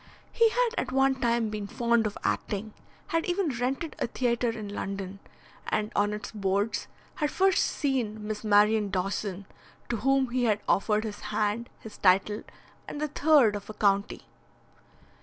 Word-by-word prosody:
He 460 -1 +4
had - - +2
at 260 - -3
one 270 +1 +3
time 235 -3 0
been 210 -1 -4
fond 235 +1 +1
of 210 - -6
acting, 210 +1 -2 0.4
had 330 0 +1
even 350 -6 0
rented 270 +6 -2
a - - 0
theatre 240 -1 0
in 220 -2 -5
London, 195 -1 -5 0.5
and 210 0 -1
on 205 0 +2
its 210 0 -5
boards 205 +1 -1 0.3
had 300 - +1
first 385 +3 +3
seen 235 -7 -1
Miss 215 0 -4
Marion 210 0 +4
Dawson, 195 +1 -2 0.4
to 240 - 0
whom 265 +2 +2
he 250 0 +1
had 215 -2 +2
offered 210 +2 +2
his 210 -2 -5
hand, 215 +3 -1
his 220 - -12
title, 195 +3 +3 0.5
and 290 - -6
the 305 0 -1
third 285 -7 +4
of 205 0 -7
a 215 - -7
county. 200 -1 +1
220 Hz, 160 wpm, -28 LUFS, 205-260 Hz, 0.5 s, He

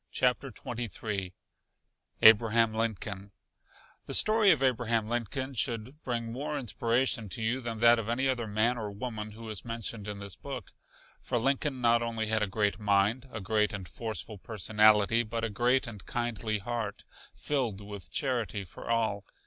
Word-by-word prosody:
CHAPTER 125 +2 +1
XXIII 110 -5 -4 0.9
ABRAHAM 110 +1 +6
LINCOLN 105 -3 -3 0.8
The - - +1
story 215 -1 +6
of 155 -7 +4
Abraham 115 -4 +1
Lincoln 120 +4 -2
should 125 +4 -2
bring 115 -2 -3
more 145 +4 -3
inspiration 120 -2 0
to 110 - -4
you 120 +4 0
than 115 -2 -4
that 120 0 +7
of 110 0 -4
any 130 +3 +1
other 125 -4 -1
man 110 +4 +1
or 105 -2 -4
woman 110 0 -6
who 115 +1 -10
is 110 -3 -2
mentioned 115 -2 -4
in 105 -1 -4
this 100 -1 -6
book. 135 -3 -7 0.5
For 125 - -2
Lincoln 135 +2 0
not 120 0 +4
only 115 -1 -2
had 110 0 +1
a 105 - +1
great 100 0 0
mind, 105 +5 +1
a 110 - -5
great 105 +2 +1
and 95 -3 -6
forceful 110 -2 -6
personality, 110 +1 +3
but 115 0 -4
a 115 - -1
great 125 +4 +2
and 105 -5 -8
kindly 115 -3 -2
heart, 110 0 -4 0.3
filled 125 -9 -1
with 100 -2 -9
charity 120 - -1
for 90 - -10
all. 110 -3 0
115 Hz, 165 wpm, -30 LUFS, 105-120 Hz, 0.9 s, that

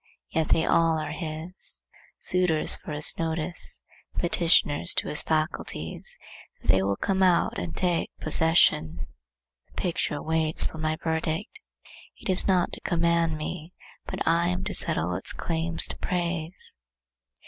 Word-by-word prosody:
Yet 160 -1 0
they 160 - +3
all 165 -1 +3
are 155 -1 -4
his, 160 +3 0 0.4
suitors 180 -4 +3
for - - -9
his 150 0 +7
notice, 165 +1 -1 0.3
petitioners 170 -4 +2
to - - -1
his 150 - +1
faculties 155 - -1 0.4
that - - -10
they 95 +2 +5
will 100 +1 0
come 190 - -1
out 180 -2 +2
and 85 -2 -5
take 175 -2 0
possession. 155 - +2 0.6
The - - -28
picture 165 -4 -2
waits 160 0 +1
for 160 - -4
my 155 0 -1
verdict; 160 - -2 0.6
it - - -8
is 185 - +2
not 185 -3 +2
to - - -5
command 170 -2 +1
me, 160 +2 -6 0.3
but - - -4
I 170 +1 +3
am 180 +1 -2
to 195 +1 -4
settle 85 - -1
its 90 - +1
claims 165 0 +1
to - - -6
praise. 175 -1 -1
160 Hz, 145 wpm, -26 LUFS, 155-175 Hz, 0.6 s, his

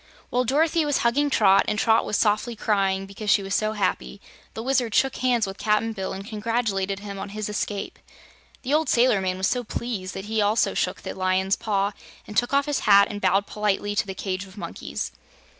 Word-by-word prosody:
While 250 +1 +1
Dorothy 315 +5 +2
was 290 -2 +1
hugging 285 +5 +2
Trot, 200 -6 +4
and 210 - 0
Trot 225 +1 +3
was 210 - 0
softly 215 +3 +1
crying 195 -3 0
because 200 +2 -6
she 200 - +4
was 195 0 -4
so 215 +1 +1
happy, 125 - -2 0.4
the 225 - -5
Wizard 250 -4 0
shook 270 -1 +2
hands 245 -4 +2
with 195 0 -7
Cap'n 220 +1 +1
Bill 190 -3 -4
and 195 +1 -6
congratulated 210 -3 -2
him 200 -1 -7
on 200 - -5
his 210 +1 -4
escape. 205 -1 -4 0.6
The 270 +2 -1
old 310 +1 +2
sailor 235 -4 +4
man 185 -1 -1
was 190 - -1
so 250 +4 0
pleased 210 -5 -4
that 195 - -6
he 220 0 0
also 210 +2 +2
shook 180 +1 -2
the - - -5
Lion's 190 +1 +1
paw 200 -2 0 0.3
and 210 - -10
took 240 +3 +2
off 280 0 +3
his 290 -2 -1
hat 200 0 +7
and 205 0 -6
bowed 195 +2 +2
politely 205 -1 -1
to 205 - 0
the 190 - -5
cage 185 -1 -3
of 190 +2 -16
monkeys. 70 - -5
210 Hz, 210 wpm, -24 LUFS, 195-235 Hz, 0.6 s, hat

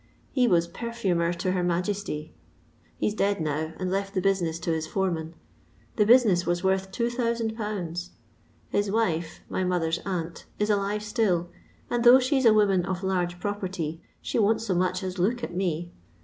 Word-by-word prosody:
He 250 -2 +3
was 170 -5 +3
perfumer 190 -7 -1
to 180 +2 -1
her 185 -1 0
Majesty: 175 -2 -2 0.6
he - - 0
's - - -5
dead 200 -1 +1
now, 155 +1 -2
and 185 -1 -2
left 195 +1 -2
the - - +2
busineu 175 -4 +1
to 170 - -1
his 160 -1 -1
foreman. 170 -4 -2 0.6
The 210 -2 +3
business 220 -7 +5
was 175 +1 -1
worth 190 0 +1
2000/. 220 -7 -2 0.6
His 205 0 0
wife, 175 -7 -1
my 185 - -2
mother's 170 -2 0
aunt, 170 -3 -4
is 210 +1 +1
alive 205 +1 0
still, 195 -5 0 0.4
and 240 -1 -1
though 245 +1 +9
she 265 +1 +1
's - - 0
a 225 - +7
woman 195 -4 +3
of 185 +1 -3
large 180 -2 -1
property, 180 -5 -3 0.2
she - - -1
won't 215 +1 +3
so 210 -4 -1
much 185 +1 0
as 185 0 -4
look 235 +7 +1
at - - -4
me. 175 -2 -2
190 Hz, 175 wpm, -26 LUFS, 175-210 Hz, 0.6 s, though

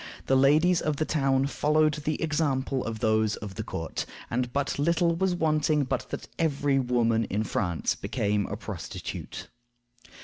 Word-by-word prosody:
The 135 - +3
ladies 155 +7 +4
of 155 -1 0
the 155 - -1
town 135 -3 +2
followed 150 +2 +2
the 150 0 -2
example 140 -4 0
of 110 -1 -4
those 110 -1 +2
of 105 -2 -7
the - - -4
court, 80 0 -4 0.2
and 125 +1 -1
but 140 +1 -1
little 170 +2 +2
was 185 +1 +1
wanting 155 -2 +2
but 130 -1 -3
that - - -6
every 145 -4 +2
woman 115 -3 +2
in 105 +3 -1
France 90 -5 -1
became 105 0 -1
a 100 - -4
prostitute. 105 -5 -6
135 Hz, 160 wpm, -27 LUFS, 115-155 Hz, 0.2 s, ladies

